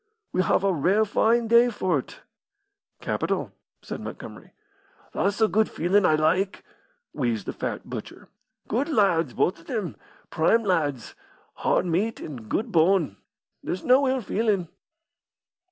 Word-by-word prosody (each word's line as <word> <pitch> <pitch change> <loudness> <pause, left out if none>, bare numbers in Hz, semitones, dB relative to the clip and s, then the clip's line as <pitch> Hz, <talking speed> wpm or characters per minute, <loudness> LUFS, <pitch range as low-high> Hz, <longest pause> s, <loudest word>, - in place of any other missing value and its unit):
"We 185 - +1
have 190 - +1
a 195 -1 +2
rare 190 +8 +2
fine 230 +3 +2
day 235 +2 +5
for't." 180 - -2 0.8
"Capital," - - -2 0.3
said - - -6
Montgomery. - - -9 0.6
"That's 200 +1 0
the 220 - +4
good 215 0 +1
feelin' 185 +3 +2
I 155 - +4
like," 175 +6 +1 0.5
wheezed 120 -7 -1
the - - -4
fat - - -5
butcher. - - -8 0.4
"Good 260 +8 -1
lads, 175 - +2
both 180 - +1
of 165 - -19
them! 195 - -3 0.4
prime 225 +9 +3
lads! 145 - -1 0.4
hard - - +1
meat 190 +7 -1
an' 125 -8 -8
good 225 +2 -1
bone. 165 - +2 0.5
There's 180 - -4
no 265 +2 +4
ill 260 0 0
feelin'." 205 -5 0
190 Hz, 135 wpm, -25 LUFS, 160-220 Hz, 0.8 s, day